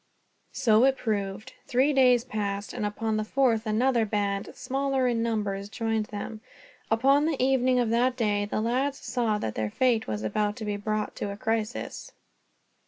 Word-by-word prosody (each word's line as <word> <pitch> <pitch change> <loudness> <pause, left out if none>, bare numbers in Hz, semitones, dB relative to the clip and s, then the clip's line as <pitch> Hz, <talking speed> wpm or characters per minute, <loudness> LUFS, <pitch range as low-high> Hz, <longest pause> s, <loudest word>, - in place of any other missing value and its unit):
So 225 -3 +4
it 270 0 +3
proved. 210 +2 -3
Three 265 +4 +2
days 250 -3 +5
passed, 205 -4 -3
and 210 - -2
upon 220 +1 -2
the 215 - 0
fourth 230 -2 +1
another 235 +2 +2
band, 205 -2 -1
smaller 270 -1 0
in 235 -2 +1
numbers, 205 -3 -2
joined 225 -1 -1
them. 215 -1 -6 0.5
Upon 275 +7 +3
the 315 -4 0
evening 255 -1 +3
of 235 -2 +1
that 245 +2 +2
day 205 -3 +1
the 210 - -2
lads 260 +5 0
saw 235 -4 -1
that 110 - -3
their 110 -1 -2
fate 240 - +1
was 105 0 -3
about 205 - 0
to 225 -3 -6
be 205 -1 -1
brought 215 +1 -2
to - - -3
a 200 - -7
crisis. 225 - -3
225 Hz, 170 wpm, -27 LUFS, 210-255 Hz, 0.5 s, days